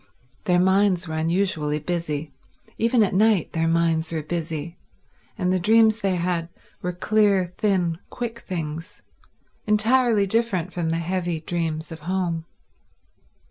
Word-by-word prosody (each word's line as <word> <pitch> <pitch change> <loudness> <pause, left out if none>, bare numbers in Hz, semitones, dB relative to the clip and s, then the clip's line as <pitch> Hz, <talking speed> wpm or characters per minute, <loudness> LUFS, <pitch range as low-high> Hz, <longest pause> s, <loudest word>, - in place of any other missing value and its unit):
Their 180 -1 +3
minds 190 -1 +3
were 160 - -5
unusually 160 -2 0
busy. 155 -2 -3 0.5
Even 230 0 +3
at 200 - 0
night 210 -2 +3
their 165 0 +1
minds 165 -1 +1
were 160 -2 -2
busy, 165 0 -4 0.6
and 185 -2 +1
the 185 - +2
dreams 220 +3 +4
they 195 -2 +1
had 170 -1 -1 0.3
were 180 - -2
clear, 195 -1 +2
thin, 180 -6 +1
quick 235 -1 -5
things, 165 -4 -5 0.6
entirely 220 0 +3
different 195 -5 0
from 170 -2 -1
the 165 - 0
heavy 175 -1 -2
dreams 160 -1 -3
of 160 - -7
home. 170 -1 -2
180 Hz, 135 wpm, -24 LUFS, 165-200 Hz, 0.6 s, dreams